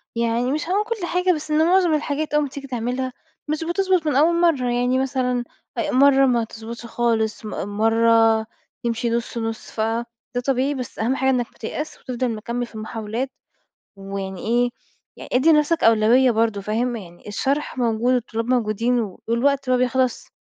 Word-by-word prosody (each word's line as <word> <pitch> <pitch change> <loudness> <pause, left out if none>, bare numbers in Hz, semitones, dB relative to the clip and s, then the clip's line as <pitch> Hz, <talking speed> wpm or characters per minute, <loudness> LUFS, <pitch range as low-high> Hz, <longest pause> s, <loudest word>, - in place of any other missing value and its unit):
يعني 235 +2 0
مش 305 +3 -2
هاقول 400 +3 +2
كل 440 -4 -3
حاجة، 360 +1 +1
بس 310 -1 -5
إن 310 +1 +4
معظم 360 -2 +4
الحاجات 300 0 -1
أول 300 0 +3
ما 285 - -3
تيجي 275 +1 -8
تعملها 250 +1 -2 0.3
مش 305 +2 -1
بتضبط 365 0 +1
من 295 - +1
أول 335 +5 +4
مرّة، 285 -8 +2
يعني 245 +1 +1
مثلًا 255 -2 0 0.3
أ - - -1
مرّة 275 +1 +5
ما 240 -3 +2
تضبطش 230 +1 -8
خالص، 225 -2 -1
م - - -4 0.3
مرّة 225 0 +4 0.4
تمشي 235 0 -1
نُص 235 +1 -2
نُص، 225 -1 -4
فده 225 +1 -1 0.4
طبيعي، 270 +1 +1
بس 255 -3 -6
أهم 240 +4 +1
حاجة 265 0 +1
إنك 250 -2 +2
ما - - -26
تيأسش 300 +7 -5
وتفضل 255 -1 -2
مكمل 235 +3 -3
في 235 - -17
المحاولات، 220 +4 -4 0.6
ويعني 195 -1 -6
إيه، 240 +2 +2 0.5
يعني - - -10
ادّي 265 +6 +5
لنفسك 310 +2 +3
أولوية 230 +3 +5
برضو، 220 -2 +1
فاهم؟ 235 +4 -1
يعني 175 -3 -11
الشرح 270 +6 -1
موجود 240 +1 +1
والطلاب 230 -2 -1
موجودين 240 0 +1 0.3
والوقت 265 +3 +1
ما 255 - +4
بيخلصش، 255 0 0
245 Hz, 170 wpm, -22 LUFS, 225-280 Hz, 0.6 s, مرّة